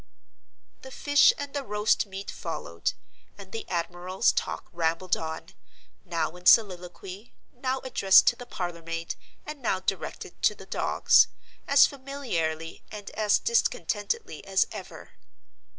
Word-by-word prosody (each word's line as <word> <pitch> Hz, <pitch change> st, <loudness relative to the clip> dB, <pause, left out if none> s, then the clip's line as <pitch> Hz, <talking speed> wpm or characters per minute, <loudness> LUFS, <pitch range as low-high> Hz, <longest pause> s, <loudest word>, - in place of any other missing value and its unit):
The 265 Hz, -, -10 dB
fish 290 Hz, -, +5 dB
and 285 Hz, -1 st, -6 dB
the 285 Hz, -1 st, -2 dB
roast 210 Hz, -1 st, +1 dB
meat 195 Hz, 0 st, -6 dB
followed; 85 Hz, -, -4 dB, 0.4 s
and 195 Hz, -2 st, -12 dB
the 225 Hz, -, -6 dB
admiral's 175 Hz, +2 st, 0 dB
talk -, -, -3 dB
rambled 170 Hz, +2 st, 0 dB
on—now 160 Hz, +1 st, -6 dB
in 180 Hz, 0 st, -5 dB
soliloquy, 190 Hz, 0 st, +2 dB, 0.2 s
now 260 Hz, +1 st, -2 dB
addressed 195 Hz, -7 st, +5 dB
to 240 Hz, -, -3 dB
the 245 Hz, 0 st, -10 dB
parlor 175 Hz, -6 st, -5 dB
maid, 165 Hz, 0 st, -4 dB, 0.3 s
and 300 Hz, -2 st, -7 dB
now 205 Hz, -6 st, 0 dB
directed 190 Hz, +1 st, -4 dB
to -, -, +3 dB
the -, -, -12 dB
dogs—as 280 Hz, 0 st, +3 dB
familiarly 225 Hz, -, -3 dB
and 205 Hz, -1 st, -8 dB
as 210 Hz, -1 st, +2 dB
discontentedly 235 Hz, -, -1 dB
as -, -, +2 dB
ever. -, -, -9 dB
195 Hz, 125 wpm, -27 LUFS, 170-245 Hz, 0.4 s, fish